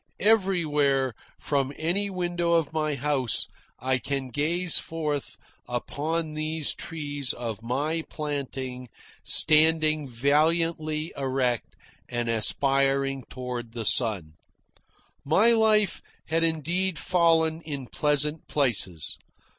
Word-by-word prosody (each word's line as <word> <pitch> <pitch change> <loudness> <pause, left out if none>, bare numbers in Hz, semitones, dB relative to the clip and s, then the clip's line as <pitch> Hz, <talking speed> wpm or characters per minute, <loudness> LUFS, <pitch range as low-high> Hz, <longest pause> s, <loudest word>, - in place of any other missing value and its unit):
Everywhere, 150 - +2 0.3
from 140 -2 0
any 185 +6 -1
window 175 -2 -1
of 165 -3 +1
my 155 -2 0
house, 135 -3 0 0.3
I 130 +1 0
can 135 +1 -3
gaze 165 +7 +1
forth 150 -3 -4 0.3
upon 155 +6 -2
these 155 0 -2
trees 145 -4 -4
of 115 -3 -5
my 145 +8 -1
planting, 135 -4 -5 0.3
standing 155 -1 +4
valiantly 155 +4 +1
erect 130 -3 -1 0.3
and 120 -1 -2
aspiring 135 +3 +2
toward 125 -2 -6
the 115 -2 -4
sun. 95 -7 +2 0.9
My 195 +11 +4
life 215 -3 +3 0.3
has 165 +1 +1
indeed 165 +3 0
fallen 165 -2 +2
in 140 -5 -5
pleasant 150 +3 -1
places. 100 - -1
150 Hz, 100 wpm, -26 LUFS, 130-165 Hz, 0.9 s, standing